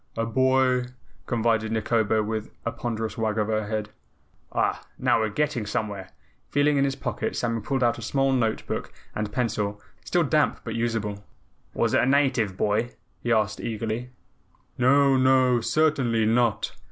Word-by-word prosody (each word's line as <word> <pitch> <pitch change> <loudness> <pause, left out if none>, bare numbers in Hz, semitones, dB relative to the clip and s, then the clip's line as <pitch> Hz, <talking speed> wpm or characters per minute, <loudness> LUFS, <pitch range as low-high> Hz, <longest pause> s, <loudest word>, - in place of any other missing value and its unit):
"A 115 - 0
boy," 130 +1 +2 0.4
confided 115 -1 +1
Nikobo 110 -1 +1
with 110 0 -3 0.2
a 115 - 0
ponderous 115 -1 -4
wag 110 -1 0
of 105 0 0
her 110 -1 0
head. 105 0 -3 0.6
"Ah, - - 0
now - - +2
we're 110 -1 0
getting 125 -1 -1
somewhere." 100 -3 -3 0.4
Feeling 145 0 +2
in 140 - +3
his 135 -1 -1
pocket, - - -3
Samuel 115 -2 -1
pulled 135 +3 -1
out 120 0 +2
a - - -8
small 135 +4 +1
note 115 -4 0
book - - -4 0.2
and 105 0 -3
pencil, 105 -3 -1 0.2
still - - +1
damp - - +1
but - - -4
usable. 110 -3 -2 0.5
"Was - - +1
it - - +4
a - - +2
native 130 -8 +2
boy?" 110 +4 0 0.3
he 120 - -1
asked 110 -1 +1
eagerly. 115 +2 -3 0.7
"No, 135 +2 +4
no, 130 -2 +4
certainly 125 -6 +2
NOT." 115 0 +1
115 Hz, 160 wpm, -25 LUFS, 110-130 Hz, 0.7 s, it